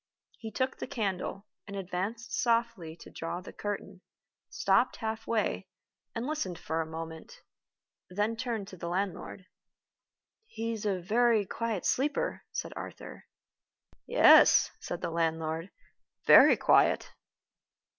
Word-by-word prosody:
He 225 - -6
took 260 +3 -2
the - - -4
candle, 195 -3 -3 0.2
and 200 - -7
advanced 195 +5 -4
softly 230 -9 0
to - - -12
draw 165 +1 -4
the 185 - -11
curtain 200 -2 -5 0.5
stopped 250 - +2
half 220 0 -4
way, 230 -2 -1 0.5
and 230 +2 -3
listened 225 - -3
for 160 0 -2
a 160 - -4
moment 160 - -8 0.7
then 205 +5 -1
turned 230 -4 -3
to 185 - -11
the 170 0 -5
landlord. 185 +1 -3 1.0
"He 230 - -4
is 215 -1 -4
a 190 -2 0
very 220 +3 +2
quiet 225 -1 -3
sleeper," 300 - 0
said - - -4
Arthur. - - -9 0.8
"Yes," - - +7
said 175 - -5
the - - -3
landlord, 165 +1 -1 0.6
"very - - +8
quiet." - - +3
205 Hz, 125 wpm, -30 LUFS, 175-230 Hz, 1.0 s, very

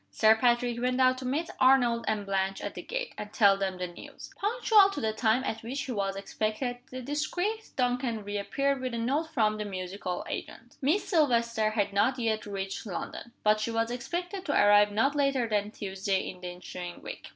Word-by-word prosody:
Sir 220 - +5
Patrick 240 0 +1
went 250 +1 0
out 255 0 +4
to 260 - -7
meet 310 +6 -1
Arnold 245 -3 +4
and 210 -2 0
Blanche 195 0 -1
at - - -5
the - - -6
gate, - - -4
and 210 0 -6
tell 200 -3 +5
them 195 -1 -2
the 180 - -2
news. 175 -1 -11
Punctual 425 -1 +4
to 395 - -4
the 220 -3 -1
time 225 +3 +2
at 225 - -3
which 255 +5 -4
he 260 - -5
was 195 -3 -1
expected, 215 +5 -2
the 255 0 -7
discreet 355 - -2
Duncan 245 -3 0
reappeared 255 +7 -1
with 255 -2 -3
a - - -2
note 280 +8 0
from 215 -5 +2
the 210 - -3
musical 185 -1 -4
agent. 240 +1 -7
Miss 310 +10 +1
Silvester 235 - +2
had 205 -2 -1
not 250 +6 +2
yet 220 -3 -1
reached 195 +1 -4
London; 205 +5 -6
but 215 0 +4
she 215 - -1
was 230 0 0
expected 355 +10 -4
to 290 - 0
arrive 205 0 +6
not 225 +7 +2
later 275 -4 +2
than 210 -1 0
Tuesday 195 -2 -2
in 180 -1 -16
the 180 - -5
ensuing 175 0 -8
week. - - -8
230 Hz, 200 wpm, -29 LUFS, 205-265 Hz, -, arrive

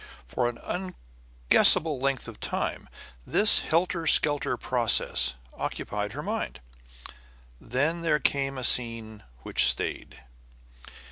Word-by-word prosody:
For 120 - -2
an 120 - -9
unguessable - - +2
length 135 -1 -3
of 115 - -11
time - - -5 0.3
this 210 - +5
helter 170 0 -2
skelter 145 -2 +1
process 65 +2 0 0.2
occupied 105 0 -6
her 145 +3 -7
mind. 215 - -5 1.0
Then 145 +8 -3
there 160 -3 0
came 135 -2 -1
a 130 - -6
scene 115 -3 0 0.2
which - - +2
stayed. - - -3
130 Hz, 110 wpm, -25 LUFS, 105-160 Hz, 1.0 s, this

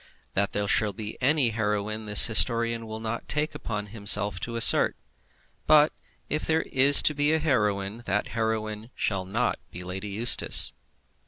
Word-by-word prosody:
That 100 +1 -2
there 105 0 -2
shall 105 +1 0
be 105 +2 -8
any 140 -1 +1
heroine 105 0 -4
the 105 - -6
historian 115 +1 +3
will 110 0 -8
not 115 +1 -7
take 150 +1 -2
upon 105 -8 -6
himself 100 -3 +1
to 115 +6 -7
assert; 115 - +6 0.7
but 150 0 +4 0.3
if 155 - -4
there 160 0 -1 0.5
be 145 +2 0
a - - +1
heroine, 105 -8 -2
that 100 +2 -2
heroine 110 -1 -5
shall 95 -3 -3
not 115 +6 -3
be 90 - -9
Lady 95 +3 -7
Eustace. 110 +4 +3
110 Hz, 150 wpm, -24 LUFS, 105-120 Hz, 0.7 s, assert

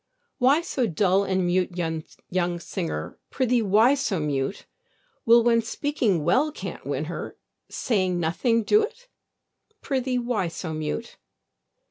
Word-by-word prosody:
Why 275 +6 +4
so 260 -7 -1
dull 190 +2 +2
and 190 -1 0
mute, 180 0 0
young 175 +1 -3
sinner? 80 - -5
Prithee, 250 -2 +1
why 215 +5 +4
so 260 -10 -1
mute? 145 +3 -2 0.6
Will, 235 0 +7
when 230 -1 +4
speaking 225 - -1
well 260 - +2
can't - - -7
win - - -2
her, - - -6 0.3
Saying 185 -6 0
nothing 225 +8 +1
do't? 450 - +1 0.8
Prithee, 260 -2 -1
why 240 -6 -1
so 165 -1 -5
mute? 155 +9 -4
205 Hz, 125 wpm, -25 LUFS, 175-250 Hz, 0.8 s, Will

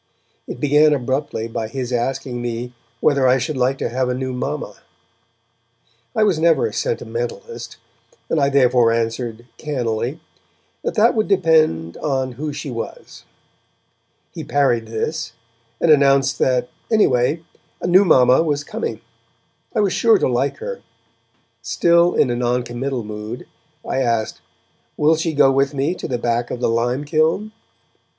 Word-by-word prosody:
It - - -7
began 150 +2 +4
abruptly 130 -3 -2
by 115 -1 -4
his 125 +1 -4
asking 120 0 -2
me 120 +1 -4 0.3
whether 140 -3 +3
I 125 +1 +4
should 150 +4 -3
like 130 +1 +1
to - - -2
have 125 +1 -1
a 125 - -1
new 130 0 -3
mamma. 125 - -4 1.4
I 220 - +3
was 195 -7 +2
never 165 0 +3
a 450 - -3
sentimentalist, 475 0 -4 0.5
and 160 - 0
I 140 - +3
therefore 125 -4 +4
answered, 115 0 -2
cannily, 125 -1 -2 0.6
that - - -2
that 225 +2 +4
would 215 -2 0
depend 160 - +2
on 130 -3 -1
who 150 +5 -5
she 145 -1 -6
was. 115 -1 -8 1.1
He - - -7
parried 125 -6 +1
this, 115 +3 -3 0.5
and 165 - +3
announced 140 -2 +4
that, 125 -1 +1 0.2
anyway, 155 - +2 0.4
a - - -5
new 185 +3 +6
mamma 130 -7 +5
was 145 -3 -1
coming; 225 +9 -5 0.7
I - - +3
was 200 -3 +1
sure 225 -2 +4
to - - +1
like 130 +3 0
her. 485 0 -6 0.8
Still 170 0 +3
in 125 - +3
a - - -1
noncommittal 125 +1 -2
mood, 105 +3 -7 0.4
I - - -1
asked: 115 -3 -1 0.6
'Will 155 +2 +4
she 160 0 -2
go 140 -2 +5
with 135 +1 +1
me 140 +5 0
to - - -6
the 125 - -2
back 120 0 -1
of 125 - -4
the 125 - +1
lime 120 +5 0
kiln?' 160 +8 +1
135 Hz, 150 wpm, -20 LUFS, 120-160 Hz, 1.4 s, new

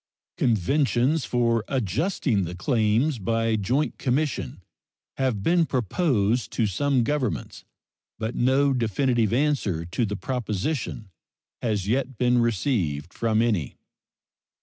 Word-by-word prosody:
Conventions 130 - +2
for 115 -1 +1
adjusting 125 - 0
the 85 +1 -6
claims 115 - +1
by 115 +3 0
joint 125 +9 -1
commission 140 +2 -1 0.5
have 125 -7 0
been 170 - +3
proposed 120 - 0
to 115 - +1
some 130 +6 +1
governments, 125 - -2 0.5
but 110 +2 -3
no 135 +3 +2
definitive 120 -1 +1
answer 120 - 0
to 85 +8 -1
the 100 0 -3
proposition 115 -2 -3 0.5
has 105 -5 -1
yet 130 +2 -1
been 125 0 +3
received 95 - 0
from 115 -1 +1
any. 100 - -1
120 Hz, 110 wpm, -25 LUFS, 105-135 Hz, 0.5 s, been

